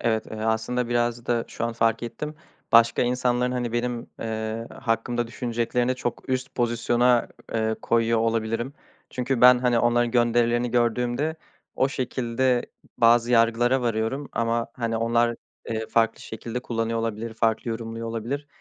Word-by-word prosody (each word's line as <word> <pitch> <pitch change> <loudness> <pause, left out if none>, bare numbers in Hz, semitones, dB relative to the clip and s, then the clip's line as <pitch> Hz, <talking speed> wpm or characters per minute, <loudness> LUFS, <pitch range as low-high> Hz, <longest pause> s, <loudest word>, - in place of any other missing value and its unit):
Evet, 110 -2 0
eee, 110 - -8
aslında 110 +3 -1
biraz 120 0 0
da 120 -1 +1
şu - - -4
an 115 - -1
fark 115 0 +1
ettim 150 +6 -5 0.4
başka 115 +1 +6
insanların 125 0 +1
hani 120 -2 -2
benim, 120 0 -2
eee, 110 0 -3
hakkımda 120 +1 -1
düşüneceklerini 120 +1 -1
çok 125 +1 -5
üst 130 0 -2
pozisyona, 120 0 +2 0.3
eee, 110 0 +1
koyuyor 115 0 +2
olabilirim. 115 +3 -1 0.4
Çünkü 125 0 -1
ben, 125 0 +8
hani, 120 -2 +2
onların 120 0 +2
gönderilerini 120 0 +2
gördüğümde 125 +6 0 0.4
o 130 - +2
şekilde 125 -1 0 0.3
bazı 120 +1 +5
yargılara 120 +2 +3
varıyorum 120 +4 -1
ama, 115 0 0
hani, 115 -2 -2
onlar, 115 +1 +1 0.3
eee, 110 -1 -2
farklı 115 0 +1
şekilde 115 +2 -6
kullanıyor 115 -2 -2
olabilir, 115 0 -3
farklı 110 +1 0
yorumluyor 115 0 -5
olabilir. 120 +6 -4
120 Hz, 140 wpm, -25 LUFS, 115-125 Hz, 0.4 s, ben